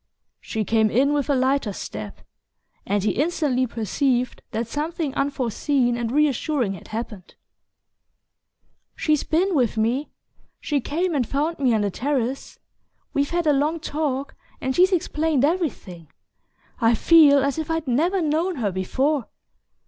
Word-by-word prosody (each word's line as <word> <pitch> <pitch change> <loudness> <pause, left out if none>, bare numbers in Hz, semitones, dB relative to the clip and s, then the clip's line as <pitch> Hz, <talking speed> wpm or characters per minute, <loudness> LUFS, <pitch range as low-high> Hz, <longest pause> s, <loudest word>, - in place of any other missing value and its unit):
She 220 -2 -3
came 220 0 +2
in 270 +7 +2
with 290 -1 -1
a 285 - +3
lighter 260 -3 +1
step, 105 - -7 0.7
and 200 0 0
he 210 - +2
instantly 275 - 0
perceived 245 - -1
that 225 +1 -3
something 300 +2 -3
unforeseen 265 -2 0
and 235 -1 -3
reassuring 285 -5 +1
had 190 - -11
happened. 215 -4 -7 1.6
"She's 305 -2 +1
been 365 +5 +1
with 245 -7 +1
me. 240 +7 0 0.5
She 290 -2 -1
came 340 +7 -1
and 260 -6 0
found 300 +4 -1
me 260 -3 +2
on 215 - +1
the 205 -1 0
terrace. 265 +3 -2 0.6
We've 280 0 +1
had 345 -1 -1
a 300 - +4
long 300 +4 0
talk 285 -3 -3 0.3
and 260 0 -2
she's 370 +2 +5
explained 315 -5 +1
everything. 275 - -3 0.7
I 230 -2 +4
feel 285 0 +6
as 280 +2 -1
if 315 - -4
I'd 325 -2 -2
never 335 +10 +1
known 320 +4 0
her 220 -7 -1
before!" 260 +9 -1
275 Hz, 145 wpm, -23 LUFS, 235-305 Hz, 1.6 s, feel